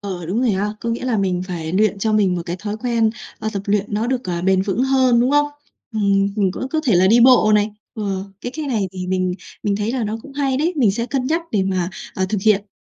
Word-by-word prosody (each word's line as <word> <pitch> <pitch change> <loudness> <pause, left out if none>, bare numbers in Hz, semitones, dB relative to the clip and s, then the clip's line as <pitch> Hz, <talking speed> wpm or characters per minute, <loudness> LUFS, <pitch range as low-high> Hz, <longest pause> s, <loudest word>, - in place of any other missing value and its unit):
Ờ, 185 -4 -5
đúng 200 +8 -1
rồi 250 - +2
ha. 205 +1 -1
Có 235 - -3
nghĩa 235 +2 -3
là 245 -4 +1
mình 185 -2 0
phải 165 -2 -4
luyện 205 0 +2
cho 220 +2 0
mình 200 -4 +3
một 170 - -3
cái 175 +1 -3
thói 210 +2 -4
quen, 230 -1 +1 0.3
ơ, 220 - -3
tập 200 -1 -3
luyện 205 0 +1
nó 220 +3 0
được, 255 0 -1
ờ, 175 -1 -3
bền 190 0 +3
vững 205 +5 -1
hơn, 260 -3 +3
đúng 250 +3 +2
không? 290 0 +4 0.5
Ừm, 200 -2 +2
mình 195 -3 +2
cũng 260 - -4
có 315 - 0
thể 230 -8 +3
là 185 +2 +5
đi 230 +4 +5
bộ 240 -4 +6
này, 210 +1 +2 0.2
ờ, 195 -3 -3 0.2
cái 245 - -5
cái 305 -2 -3
này 215 -7 0
thì 185 -1 -5
mình 185 -1 0 0.3
mình 205 -1 0
thấy 210 +3 -1
là 250 -4 -1
nó 215 +2 -2
cũng 280 - -12
hay 275 -2 0
đấy, 330 +5 0
mình 230 -9 +3
sẽ 235 +3 -2
cân 260 -2 -1
nhắc 330 +4 0
để 200 -3 +1
mà, 185 -1 -1 0.2
ờ, 190 - 0
thực 210 -2 -1
hiện. 210 -1 +3
210 Hz, 270 wpm, -20 LUFS, 190-245 Hz, 0.5 s, bộ